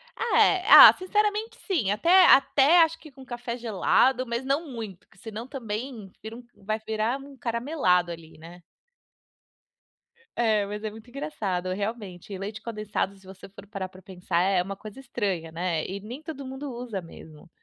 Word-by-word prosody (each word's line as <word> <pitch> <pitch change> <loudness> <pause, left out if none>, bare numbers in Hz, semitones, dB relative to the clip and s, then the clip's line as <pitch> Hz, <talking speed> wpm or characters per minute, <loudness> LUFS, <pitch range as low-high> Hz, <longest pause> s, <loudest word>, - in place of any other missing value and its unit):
Ah, 465 - +1
eh, 370 -2 +3
ah, - - +11
sinceramente 420 +4 -1
sim. 310 - 0
Até 345 - +5
até 280 +5 +6
acho 325 0 -1
que 310 - -14
com 265 0 -14
café 240 -1 -5
gelado, 245 +3 +2
mas 235 +1 -3
não 285 +5 -1
muito, 220 -7 -7
porque - - -25
senão 225 +4 -8
também 230 -4 -6
vira 220 +1 -8
um 245 - -11
vai 215 +2 -4
virar 220 +3 -2
um 275 0 -13
caramelado 230 - 0
ali, 165 -1 -11
né? 170 +3 -13 1.7
É, 220 -3 +2
mas 210 +1 -6
é 215 - -2
muito 220 +2 -14
engraçado 215 -10 -4
realmente, 200 -2 -6
e 195 - -5
leite 205 +3 -6
condensado 210 -3 -3
se 195 - -21
você 190 +1 -12
for 195 +1 -14
parar 195 -3 -5
pra 185 0 -16
pensar, 180 -3 -3
é 190 0 +2
uma 195 +2 -6
coisa 215 +4 -11
estranha, 190 -10 -3
né, 165 -1 -2
e 195 +2 -5
nem 235 +8 -9
todo 300 -4 -7
mundo 265 +2 -7
usa 235 -5 -5
mesmo. 165 0 -14
220 Hz, 175 wpm, -26 LUFS, 190-265 Hz, 1.7 s, ah